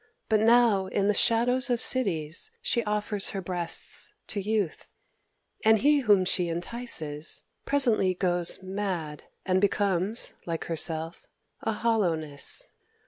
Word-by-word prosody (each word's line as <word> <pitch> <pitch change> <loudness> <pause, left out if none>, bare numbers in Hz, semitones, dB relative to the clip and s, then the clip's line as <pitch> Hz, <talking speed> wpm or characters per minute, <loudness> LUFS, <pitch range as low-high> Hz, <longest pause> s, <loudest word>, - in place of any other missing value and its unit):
But 215 -1 +3
now 225 -3 +4
in 200 +1 0
the 210 - +3
shadows 245 +5 +1
of 240 -1 +1
cities 170 -13 +1
she 235 - -1
offers 210 -1 -1
her - - -1
breasts 175 -2 -1
to 200 - -3
youth; 205 -4 -2 0.8
and 220 0 +5
he 290 +5 +3
whom 205 -7 +3
she 180 -1 -1
entices, 165 -5 -1 0.2
presently 235 -10 +3
goes 175 0 +1
mad, 185 -6 -4 0.2
and 185 0 +1
becomes, 200 +1 0
like 165 -1 -3
herself, 165 0 -3 0.3
a 225 - -1
hollowness. 175 -11 0
195 Hz, 125 wpm, -27 LUFS, 170-225 Hz, 0.8 s, and